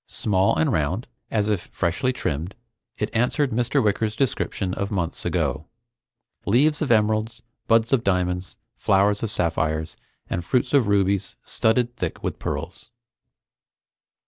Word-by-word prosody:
Small 95 -2 +1
and 80 0 +2
round, 80 +9 0 0.2
as 105 -2 +1
if 105 -4 -1
freshly 85 +10 0
trimmed, 85 - -3 0.4
it 105 - -3
answered 125 +4 +2
Mr. 125 +4 +1
Wicker's 105 +1 0
description 110 -7 -1
of 100 +1 -2
months 90 -5 -3
ago. 75 0 -1 0.8
"Leaves 145 +8 +3
of 155 - 0
emeralds, 110 +1 +1 0.2
buds 115 +2 +3
of 125 -4 +3
diamonds, 90 -1 -1 0.2
flowers 100 +1 +2
of 115 - -1
sapphires, 80 -4 -1 0.3
and 85 - -2
fruits 125 +11 0
of 135 -7 +4
rubies 100 -1 +1
studded 120 +2 +1
thick - - -4
with - - -3
pearls." - - -5
105 Hz, 135 wpm, -24 LUFS, 90-115 Hz, 0.8 s, of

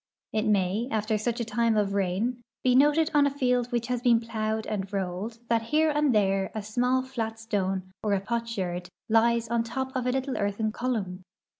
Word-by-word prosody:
It 215 0 0
may, 205 +2 +1
after 215 -1 0
such 235 +2 -1
a 235 - -1
time 225 0 +1
of 200 -1 +1
rain, 200 +6 0 0.2
he 255 - +4
noted 295 +4 +4
on 290 -1 +5
a - - +2
field 250 -3 +1
which 240 -1 0
has 250 -1 -2
been 240 -2 +4
plowed 220 -1 -2
and 195 -2 -3
rolled 195 +3 -3
that 230 -1 +2
here 305 +7 +2
and 295 -1 +2
there 195 -3 +2
a 215 - -3
small 250 +4 +1
fiat 230 -4 -4
stone 195 -4 -2
or 210 -2 0
a - - +1
potsherd 195 -5 -3 0.2
lies 230 +1 +3
on 235 0 +1
top 265 +3 -4
of 255 -1 -1
a - - +3
little 265 +1 -2
earthen 205 +2 0
column. 215 -7 -3
225 Hz, 195 wpm, -27 LUFS, 205-250 Hz, 0.2 s, on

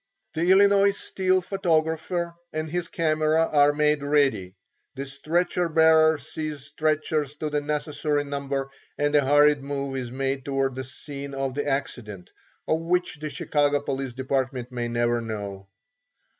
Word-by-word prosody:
The 165 +1 0
Illinois 200 +1 +5
Steel 185 -1 0
photographer 170 -1 0 0.2
and 155 0 -3
his 175 +2 -3
camera 155 0 +2
are 145 -1 +5
made 150 0 +2
ready; 135 -11 +1 0.4
the 135 0 -4
stretcher 170 +5 -1
bearers 160 -2 +4
seize 155 -2 -5
stretchers 150 0 -1
to 150 0 -4
the 150 0 0
necessary 150 0 -1
number 140 -1 -3 0.3
and 145 0 +1
a 145 - +5
hurried 145 +1 +4
move 140 -1 -4
is 125 -3 -4
made 135 +1 -2
towards 135 -2 -1
the 130 - -4
scene 140 +1 -7
of 135 -1 -2
the 145 +2 -3
accident, 115 -9 -3 0.4
of 160 - +1
which 175 -2 -1
the 155 0 -4
Chicago 145 0 +1
police 135 -2 -4
department 130 -1 -2
may 120 -1 -3
never 120 0 0
know. 100 -3 -6
145 Hz, 145 wpm, -25 LUFS, 135-155 Hz, 0.4 s, Illinois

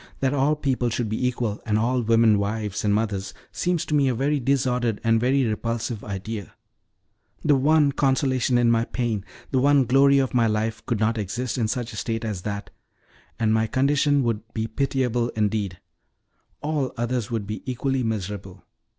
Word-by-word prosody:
That 135 0 +1
all 145 +2 +2
people 130 -5 0
should 115 -1 -2
be 110 +4 0
equal, 120 -4 -2
and 105 -2 0
all 125 +3 +1
women 115 -2 +4
wives 105 -1 -2
and 105 - +2
mothers 100 -2 -1 0.2
seems 175 -2 -1
to - - -4
me 140 -2 +4
a 125 - +1
very 140 +4 +1
disordered 125 -4 0
and 115 -1 +3
a - - +1
very 130 +3 +2
repulsive 115 0 -2
idea 100 0 -6 0.9
The 145 - +5
one 145 +2 +4
consolation 130 -2 +1
in 120 -1 +4
my 115 0 +2
pain, 115 -6 -2 0.3
the 130 - +2
one 140 0 +4
glory 140 +2 +5
of 135 -1 +1
my 120 -2 +3
life 110 +1 -1
could 115 -5 0
not 110 +1 +1
exist 115 +5 -3
in 110 - +1
such 120 +1 -3
a - - -7
state 115 0 -2
as 105 -5 -3
that, 100 +1 -5 0.7
and 110 -1 +2
my 110 0 +2
condition 140 +2 +2
would 115 -3 0
be 110 -1 -1
pitiable 125 -2 0
indeed. 105 -4 -1 0.8
All 145 -4 -1
others 120 -1 -1
would 115 -4 -2
be 105 +2 -5
equally 135 +1 -1
miserable. 100 -4 -4
120 Hz, 180 wpm, -24 LUFS, 110-130 Hz, 0.9 s, The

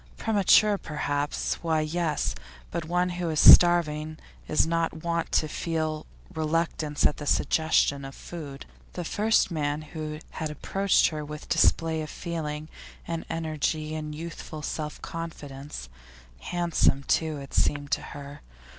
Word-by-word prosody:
Premature, 210 -1 +4
perhaps; 145 -1 -2
why, 160 -2 +1
yes, 155 -1 -1 0.4
but 170 -2 -3
one 180 +2 +1
who 175 -1 -2
is 155 -1 0
starving 155 -3 +7 0.3
is 155 - +3
not 165 -1 -1
wont 170 -1 -1
to 155 - +2
feel 155 -1 -2 0.3
reluctance 160 -2 -1
at - - +3
the 145 - -6
suggestion 145 -3 +2
of 135 0 -8
food. 145 -5 -8 0.3
The 175 - -4
first 215 +1 +2
man 150 -1 -1
who 155 0 -6
had 155 - -4
approached 195 +6 +2
her 155 -1 -5
with 150 +1 -8
display 160 -1 +3
of 155 - -6
feeling 155 -3 -4 0.4
and 165 -1 -3
energy 155 -1 -2
and 155 -1 -4
youthful 155 -1 -7
self 150 0 -4
confidence; 150 -4 -7 0.5
handsome 170 -5 +1
too, 155 +1 +1
it 140 -1 -9
seemed 145 0 +1
to - - +1
her. 140 0 -9
155 Hz, 135 wpm, -27 LUFS, 150-170 Hz, 0.5 s, starving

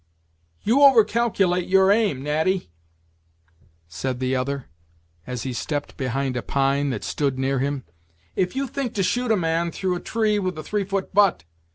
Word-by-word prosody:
"You 245 +7 +3
over 270 -6 +8
calculate 195 -6 +1
your 190 +1 +5
aim, 205 - +1
Natty," 160 - 0 1.2
said 125 +10 -4
the 130 0 0
other, 135 +1 -2 0.6
as 125 -2 -4
he 130 - -3
stepped 145 +4 -4
behind 130 0 -2
a 120 - -1
pine 140 +2 +1
that 130 - -3
stood 140 -3 -1
near 135 0 0
him, 140 0 -2 0.5
"if 185 +5 0
you 275 +1 0
think 265 -1 -4
to 195 - +1
shoot 245 +6 0
a 220 - +4
man 165 0 0
through 185 +1 -1
a 175 - -3
tree 215 0 0
with 185 -4 -2
a 155 - -5
three 205 +2 -2
foot 195 0 -3
butt. 195 - +3
170 Hz, 175 wpm, -23 LUFS, 135-205 Hz, 1.2 s, over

